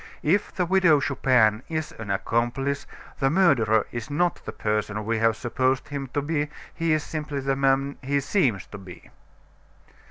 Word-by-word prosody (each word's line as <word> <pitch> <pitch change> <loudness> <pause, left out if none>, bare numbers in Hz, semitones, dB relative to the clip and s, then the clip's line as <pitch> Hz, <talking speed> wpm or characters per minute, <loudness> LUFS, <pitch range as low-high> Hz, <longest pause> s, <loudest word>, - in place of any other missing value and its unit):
If 195 +7 +1
the 180 - -1
Widow 180 -4 +4
Chupin 125 -6 +2
is 155 -1 -3
an 110 -2 -7
accomplice, 120 +8 -1 0.3
the 135 -1 +3
murderer 135 - +3
is 120 +2 -5
not 175 +4 0
the - - -4
person 105 0 -2
we 115 0 0
have 115 0 +3
supposed 130 +4 0
him 140 -1 -4
to 145 - +1
be; 150 -1 -1 0.2
he 165 -1 -1
is 155 -1 +2
simply 150 -2 -4
the 135 0 0
man 135 +1 +1
he 140 +1 0
seems 135 - 0
to - - -7
be." 95 -2 -13
135 Hz, 165 wpm, -25 LUFS, 115-150 Hz, 0.3 s, Widow